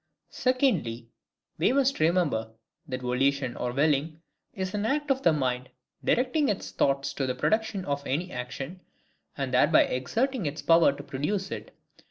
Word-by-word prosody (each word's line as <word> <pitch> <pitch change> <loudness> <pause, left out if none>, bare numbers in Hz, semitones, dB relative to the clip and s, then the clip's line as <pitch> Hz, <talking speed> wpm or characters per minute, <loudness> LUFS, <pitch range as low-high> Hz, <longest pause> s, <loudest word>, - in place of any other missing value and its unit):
Secondly, 185 - 0 0.5
we - - +3
must 275 0 +2
remember, 155 -10 +1 0.3
that 130 -1 -4
VOLITION 130 +1 +1
or 125 - -2
WILLING 150 +3 +1 0.3
is 190 -1 -4
an 210 0 -1
act 290 +5 0
of 265 0 +1
the 170 - +5
mind 130 -4 -1 0.3
directing 265 +4 +2
its 200 - -3
thought 140 0 +1
to 140 -1 -2
the 130 - -1
production 215 - 0
of 140 0 -3
any 170 +7 -1
action, 135 +7 -6 0.6
and - - -3
thereby - - +5
exerting 225 - -1
its 145 +2 -5
power 165 -3 +6
to 140 +1 -9
produce 185 +9 -2
it. - - -7
155 Hz, 155 wpm, -27 LUFS, 130-210 Hz, 0.6 s, power